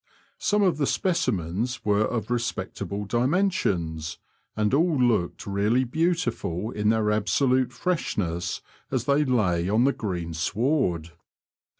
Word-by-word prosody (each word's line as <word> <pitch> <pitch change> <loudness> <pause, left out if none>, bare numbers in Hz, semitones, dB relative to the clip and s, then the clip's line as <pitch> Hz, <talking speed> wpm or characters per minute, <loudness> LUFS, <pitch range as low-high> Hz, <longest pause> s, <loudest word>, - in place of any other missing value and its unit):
Some 210 0 +2
of 180 -6 +2
the 145 -3 +1
specimens 120 - -1
were 105 0 +3
of 115 +1 -2
respectable 115 -3 -3
dimensions, 120 - 0 0.4
and 105 +2 +1
all 160 +2 +3
looked 110 -8 +1
really 105 +6 +2
beautiful 125 - -1
in 105 0 0
their 110 -1 +2
absolute 125 +5 +2
freshness 90 - -2 0.3
as 130 -3 -1
they 140 +2 +3
lay 95 -10 +1
on 110 +4 +3
the 140 +1 +3
green 90 -6 -4
sward. 90 - 0
115 Hz, 120 wpm, -26 LUFS, 95-135 Hz, 0.4 s, were